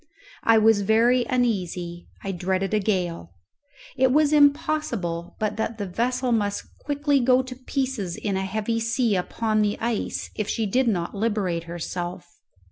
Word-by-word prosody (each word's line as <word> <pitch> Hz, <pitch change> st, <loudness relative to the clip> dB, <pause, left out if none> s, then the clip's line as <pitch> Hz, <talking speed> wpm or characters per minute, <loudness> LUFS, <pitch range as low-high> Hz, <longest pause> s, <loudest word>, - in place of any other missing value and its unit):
I 225 Hz, 0 st, +5 dB
was 220 Hz, -1 st, +5 dB
very 235 Hz, +4 st, +3 dB
uneasy; 180 Hz, -8 st, -1 dB, 0.2 s
I 195 Hz, -, -2 dB
dreaded 190 Hz, +2 st, -1 dB
a 215 Hz, -, +3 dB
gale. 175 Hz, -, -2 dB, 0.6 s
It 260 Hz, -1 st, +3 dB
was 300 Hz, +2 st, +3 dB
impossible 280 Hz, -, +1 dB
but 215 Hz, -1 st, -2 dB
that 220 Hz, 0 st, -2 dB
the 205 Hz, -, -3 dB
vessel 250 Hz, +6 st, -1 dB
must 205 Hz, -3 st, -1 dB
quickly 285 Hz, -1 st, +1 dB
go 255 Hz, +1 st, +4 dB
to 255 Hz, 0 st, -8 dB
pieces 255 Hz, -8 st, -3 dB
in 200 Hz, -2 st, -2 dB
a 190 Hz, -, 0 dB
heavy 215 Hz, +4 st, -1 dB
sea 230 Hz, -1 st, +1 dB
upon 215 Hz, +4 st, 0 dB
the 210 Hz, 0 st, +1 dB
ice 230 Hz, -2 st, -2 dB
if 210 Hz, -1 st, -3 dB
she 225 Hz, -, 0 dB
did 250 Hz, +5 st, +1 dB
not 175 Hz, -6 st, 0 dB
liberate 200 Hz, -6 st, -1 dB
herself. 175 Hz, +1 st, -5 dB
215 Hz, 155 wpm, -24 LUFS, 190-250 Hz, 0.6 s, I